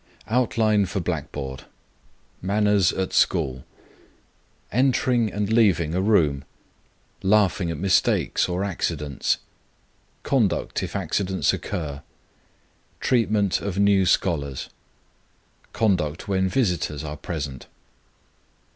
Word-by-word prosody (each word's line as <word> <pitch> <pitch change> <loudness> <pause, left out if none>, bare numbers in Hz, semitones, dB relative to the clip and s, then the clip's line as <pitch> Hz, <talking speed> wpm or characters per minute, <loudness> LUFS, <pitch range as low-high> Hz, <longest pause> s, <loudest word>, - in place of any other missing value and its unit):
OUTLINE 110 -4 +2
FOR 100 +2 -3
BLACKBOARD. 65 -5 -4 0.8
MANNERS 100 -1 +2
AT 95 -1 -3
SCHOOL. 65 -1 +1 1.1
Entering 125 -2 +2
and 105 +1 -1
leaving 95 -9 +3
room. 85 -7 +2 0.8
Laughing 95 -3 +2
at 85 - -3
mistakes 95 +1 +2
or 90 +2 -1
accidents. 80 -7 -1 0.9
Conduct 105 - 0
if - - -5
accidents 95 -1 0
occur. 75 -4 -4 1.0
Treatment 105 -6 +1
of 100 -2 -4
new 100 -2 +4
scholars. 70 -9 0 1.0
_Conduct 90 -7 0
when 95 -1 0
visitors 90 - -1
are 75 -1 -5
present. 75 -5 -6
95 Hz, 90 wpm, -24 LUFS, 80-105 Hz, 1.1 s, new